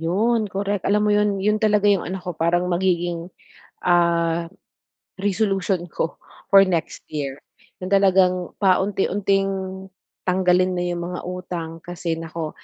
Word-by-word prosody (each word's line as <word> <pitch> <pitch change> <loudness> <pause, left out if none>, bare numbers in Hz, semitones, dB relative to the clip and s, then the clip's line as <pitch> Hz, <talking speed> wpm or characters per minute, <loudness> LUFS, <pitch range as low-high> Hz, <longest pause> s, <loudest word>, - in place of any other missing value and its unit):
'yon 215 +6 +1
correct. 200 0 -2
Alam 210 +1 +3
mo 210 - +2
yon, 205 -1 +2
yon 210 +1 +2
talaga 210 -2 +2
yung 195 -3 +2
ano 190 +1 -3
ko 180 - -4
parang 170 +2 +1
magiging, 175 -1 0 0.5
ah, 170 -1 +2 0.8
resolution 195 -2 0
ko 165 0 -4 0.3
for 195 0 +8
next 170 -3 -2
year. 140 -3 -4 0.4
Yung 185 +1 -6
talagang 185 -2 +3
paunti-unting 195 -1 0 0.4
tanggalin 185 0 +3
na 175 - -1
yung 175 0 -3
mga 180 +1 -5
utang 180 -2 -5
kasi 175 -1 -3
naku, 165 -1 -5
185 Hz, 135 wpm, -22 LUFS, 175-195 Hz, 0.8 s, for